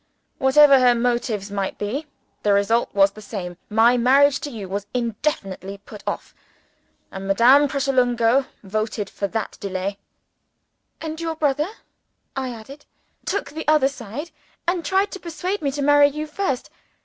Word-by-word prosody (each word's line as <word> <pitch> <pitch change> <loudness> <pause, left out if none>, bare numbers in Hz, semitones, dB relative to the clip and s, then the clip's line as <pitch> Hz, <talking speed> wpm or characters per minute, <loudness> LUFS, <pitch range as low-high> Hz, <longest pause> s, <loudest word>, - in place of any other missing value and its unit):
"Whatever 275 +1 +6
her 250 -1 +5
motives 235 -4 -1
might 195 -1 -3
be, 260 +10 -3 0.3
the 205 - +3
result 215 +4 +2
was 195 0 +4
the 215 - -12
same. 185 -4 -6
My 230 +3 +4
marriage 275 +4 +4
to 290 - -5
you 215 -7 -7
was 200 +2 -4
indefinitely 215 -5 -2
put 205 +1 -13
off; - - -4 0.8
and 195 0 -6
Madame 250 +9 +6
Pratolungo 260 -2 +2 0.2
voted 215 0 -3
for 200 - -2
that 220 +2 -4
delay." 195 0 -3 1.0
"And 320 0 -5
your 325 -1 -2
brother," 300 +1 0 0.7
I 265 -1 -2
added, 250 +5 -10 0.4
"took 400 -6 -2
the 315 +1 -6
other 300 -3 +4
side, 270 +5 -7 0.4
and 350 -1 0
tried 380 +6 +1
to 385 - -7
persuade 360 +4 -4
me 285 - 0
to 285 +1 -3
marry 290 0 +6
you 300 +2 -4
first. 305 -4 -3
250 Hz, 150 wpm, -22 LUFS, 205-290 Hz, 1.0 s, Whatever